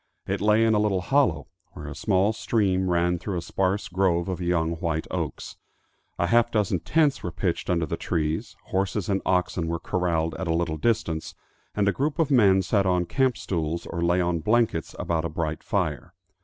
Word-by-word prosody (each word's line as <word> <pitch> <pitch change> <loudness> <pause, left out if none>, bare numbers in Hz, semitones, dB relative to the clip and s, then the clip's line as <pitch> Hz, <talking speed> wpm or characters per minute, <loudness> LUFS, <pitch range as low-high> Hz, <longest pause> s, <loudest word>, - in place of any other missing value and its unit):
It - - -2
lay 105 +2 +4
in 110 - +3
a 105 - +3
little 100 -3 +1
hollow, 140 +6 +2 0.3
where - - -9
a - - -6
small 95 +4 +1
stream 95 -5 0
ran 85 0 +1
through 95 0 -3
a - - -2
sparse 95 +1 -1
grove 90 -1 +1
of 90 -1 -3
young 85 -2 +1
white 80 -1 -2
oaks. - - -4 0.6
A - - +1
half 120 +6 +3
dozen 105 -5 0
tents 150 - +1
were 90 - -4
pitched 85 0 -2
under 85 -2 +1
the - - -4
trees, 80 -2 -2
horses 95 +1 -1
and 95 -1 +1
oxen 90 -2 +1
were 85 +1 -1
corraled 85 -2 -1
at 95 - -3
a 80 - +1
little 85 -2 -1
distance, 85 -5 -1 0.4
and 100 -1 +1
a - - +4
group 145 - -1
of 160 -4 +1
men 100 -7 +5
sat 100 +1 +1
on 90 -1 +2
camp 130 +4 +1
stools 85 -2 -3
or 85 - -4
lay 85 +1 +2
on 85 -1 0
blankets 110 -2 +1
about 80 -2 -1
a 85 - -2
bright 80 -1 -3
fire. 90 +2 -2
90 Hz, 195 wpm, -25 LUFS, 85-105 Hz, 0.6 s, men